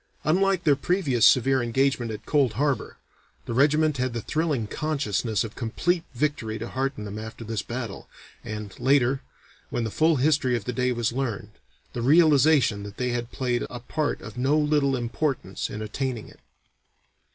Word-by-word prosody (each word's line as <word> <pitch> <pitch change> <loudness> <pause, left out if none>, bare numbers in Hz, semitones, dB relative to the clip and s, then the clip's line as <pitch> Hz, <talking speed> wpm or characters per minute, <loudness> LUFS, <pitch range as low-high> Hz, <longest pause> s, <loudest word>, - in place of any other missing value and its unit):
Unlike 190 +3 +2
their 145 -3 +4
previous 140 - +3
severe 130 +1 +4
engagement 120 0 +1
at 110 -1 -7
Cold 140 -6 +2
Harbor, 140 +4 -1 0.5
the - - -4
regiment 150 +3 +3
had 130 -1 -1
the 115 - -3
thrilling 155 -7 0
consciousness 120 -6 -1
of 110 -1 -7
complete 165 +9 -1
victory 120 -5 -1
to 115 +2 -6
hearten 135 -4 -2
them 105 +1 -6
after 110 +1 -8
this 110 -1 -2
battle, 120 -4 -6 0.3
and, 105 -2 -6
later, 135 0 +3 0.5
when 120 - -2
the 110 - -3
full 160 +5 +3
history 135 -2 +2
of 105 - -8
the 125 - -2
day 125 +1 +1
was 120 -1 -1
learned, 115 -5 -3 0.4
the 120 - -3
realization 145 -5 +4
that 100 0 -9
they 125 -1 -1
had 120 0 -3
played 125 -2 -1
a 120 - -7
part 150 +5 -2
of 115 +2 -8
no 135 +4 +3
little 150 -2 +2
importance 120 -3 -2
in 105 +1 -5
attaining 120 +1 -3
it. - - -18
130 Hz, 170 wpm, -25 LUFS, 115-145 Hz, 0.5 s, their